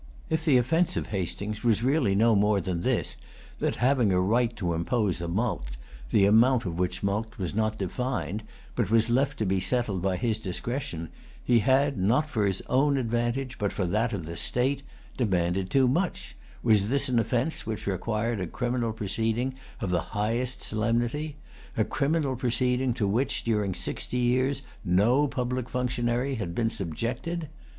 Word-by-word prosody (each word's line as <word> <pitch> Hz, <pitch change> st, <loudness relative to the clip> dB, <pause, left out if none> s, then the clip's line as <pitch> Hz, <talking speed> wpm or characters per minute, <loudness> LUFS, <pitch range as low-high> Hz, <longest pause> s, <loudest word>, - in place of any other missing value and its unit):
If 160 Hz, 0 st, +1 dB
the 145 Hz, -6 st, +5 dB
offence 160 Hz, +8 st, +2 dB
of -, -, -3 dB
Hastings 100 Hz, +2 st, -3 dB
was 115 Hz, -2 st, +2 dB
really 130 Hz, -7 st, +2 dB
no 115 Hz, +2 st, +4 dB
more 105 Hz, 0 st, +3 dB
than 90 Hz, -2 st, -2 dB
this, -, -, 0 dB, 0.4 s
that, -, -, 0 dB
having 125 Hz, -4 st, +3 dB
a 90 Hz, -, +3 dB
right 115 Hz, +5 st, +2 dB
to 90 Hz, -5 st, -1 dB
impose 95 Hz, +2 st, 0 dB
a 85 Hz, -, -3 dB
mulct, 85 Hz, -, -2 dB, 0.3 s
the 100 Hz, -, +4 dB
amount 115 Hz, +4 st, +5 dB
of 85 Hz, -1 st, -3 dB
which 90 Hz, +1 st, -1 dB
mulct 105 Hz, +3 st, -1 dB
was 90 Hz, -6 st, -3 dB
not 110 Hz, 0 st, 0 dB
defined, 110 Hz, +1 st, -2 dB, 0.3 s
but -, -, 0 dB
was 115 Hz, +1 st, +3 dB
left 135 Hz, +3 st, +2 dB
to 110 Hz, -, 0 dB
be 95 Hz, 0 st, +1 dB
settled 105 Hz, -2 st, -1 dB
by 95 Hz, 0 st, 0 dB
his 110 Hz, +1 st, 0 dB
discretion, 95 Hz, -, -4 dB, 0.3 s
he 120 Hz, -1 st, +4 dB
had, 135 Hz, +2 st, +2 dB
not 120 Hz, +11 st, +2 dB
for 105 Hz, -3 st, +1 dB
his 95 Hz, -1 st, -2 dB
own 140 Hz, +2 st, +3 dB
advantage, 120 Hz, +2 st, -1 dB
but 100 Hz, -2 st, 0 dB
for 95 Hz, -, -1 dB
that 110 Hz, +6 st, +1 dB
of 95 Hz, -7 st, -4 dB
the 85 Hz, +1 st, -6 dB
state, 130 Hz, +8 st, 0 dB, 0.4 s
demanded 95 Hz, -4 st, +1 dB
too 135 Hz, -2 st, +4 dB
much, 170 Hz, +8 st, -1 dB, 0.3 s
was 105 Hz, -3 st, +4 dB
this 140 Hz, +2 st, +1 dB
an 125 Hz, -2 st, +2 dB
offence 125 Hz, +4 st, -1 dB
which 110 Hz, -1 st, -4 dB
required 110 Hz, +3 st, -1 dB
a 90 Hz, -, -2 dB
criminal 120 Hz, +2 st, -1 dB
proceeding 115 Hz, +4 st, -1 dB, 0.3 s
of 95 Hz, -, -1 dB
the 90 Hz, -2 st, +2 dB, 0.2 s
highest 120 Hz, +5 st, -1 dB
solemnity,—a 120 Hz, +4 st, -2 dB
criminal 145 Hz, -1 st, 0 dB
proceeding 125 Hz, +1 st, +1 dB
to 105 Hz, -5 st, 0 dB
which, 125 Hz, +7 st, 0 dB
during 105 Hz, -5 st, 0 dB
sixty 125 Hz, -, -4 dB
years, 130 Hz, +3 st, +1 dB, 0.2 s
no 115 Hz, +11 st, +3 dB
public 125 Hz, -1 st, -2 dB
functionary 125 Hz, +1 st, 0 dB
had 100 Hz, -8 st, -4 dB
been 115 Hz, -1 st, +1 dB
subjected? 120 Hz, -, -3 dB
115 Hz, 170 wpm, -27 LUFS, 100-130 Hz, 0.4 s, the